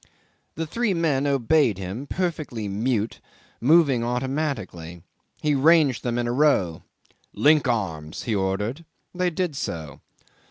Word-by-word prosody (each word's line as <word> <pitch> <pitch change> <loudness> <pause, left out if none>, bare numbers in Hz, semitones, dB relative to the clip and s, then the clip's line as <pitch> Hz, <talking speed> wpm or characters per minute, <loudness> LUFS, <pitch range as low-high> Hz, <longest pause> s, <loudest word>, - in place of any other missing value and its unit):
The 160 - -3
three 215 +4 -1
men 145 -5 +1
obeyed 140 - +2
him, 100 +9 -6
perfectly 155 - -3
mute, 110 +2 -1 0.4
moving 140 -3 +4
automatically. 120 - -3 0.4
He 150 -1 +2
ranged 145 -2 +4
them 120 -1 -2
in 120 - 0
a - - 0
row. 125 - +2 0.5
"Link 150 -1 +4
arms!" 80 -10 -2
he 115 - -2
ordered. 105 +9 -1 0.3
They 180 0 0
did 175 -2 -2
so. 80 - -5
130 Hz, 125 wpm, -24 LUFS, 105-155 Hz, 0.5 s, moving